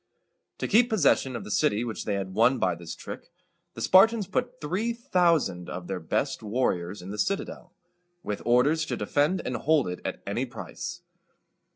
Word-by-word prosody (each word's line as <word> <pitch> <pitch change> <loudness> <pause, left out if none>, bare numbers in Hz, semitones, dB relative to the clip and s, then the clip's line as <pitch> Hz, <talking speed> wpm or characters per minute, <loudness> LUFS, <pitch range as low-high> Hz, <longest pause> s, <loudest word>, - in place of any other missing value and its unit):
To - - -2
keep 235 +4 +4
possession 145 - +2
of 115 - -5
the - - -8
city 105 +3 +2
which 115 -3 -5
they 105 - 0
had 95 -1 -4
won 120 +6 +4
by 95 -5 +1
this 85 -1 -8
trick, - - -9 0.4
the - - -7
Spartans 215 +3 +5
put 250 +6 -3
three 205 +10 -1
thousand 170 - +1
of 90 - -6
their 95 0 -4
best 130 - -1
warriors 105 -5 -1
in 95 - -7
the 105 - -6
citadel, 195 - -3 0.5
with 105 - -4
orders 140 +7 +3
to - - -2
defend 150 +6 +1
and 125 - -2
hold 155 -5 +2
it 90 0 -5
at - - -5
any - - -2
price. - - -7
130 Hz, 180 wpm, -27 LUFS, -, 0.5 s, Spartans